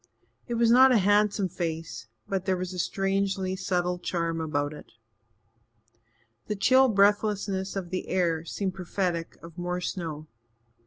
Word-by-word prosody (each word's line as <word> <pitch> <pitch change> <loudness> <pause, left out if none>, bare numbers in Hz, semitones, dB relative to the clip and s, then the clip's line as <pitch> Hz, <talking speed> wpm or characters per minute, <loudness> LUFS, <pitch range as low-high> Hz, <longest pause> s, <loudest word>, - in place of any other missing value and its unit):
It 240 - -2
was 230 0 +3
not 260 +2 +7
a 245 - +5
handsome 205 0 +3
face, 165 -8 -5 0.2
but 190 -1 -2
there 185 0 +1
was 185 0 -4
a 180 - -5
strangely 195 0 -1
subtle 180 -2 -1
charm 165 -2 -2
about 145 -2 -1
it. - - -13 1.5
The 210 - -2
chill 260 +6 +5
breathlessness 200 -2 +1
of 185 -3 -5
the 185 - -3
air 170 -3 0
seemed 190 +2 -3
prophetic 180 -2 -3
of 165 +1 -11
more 180 0 -2
snow. 165 -4 -4
185 Hz, 145 wpm, -27 LUFS, 170-200 Hz, 1.5 s, not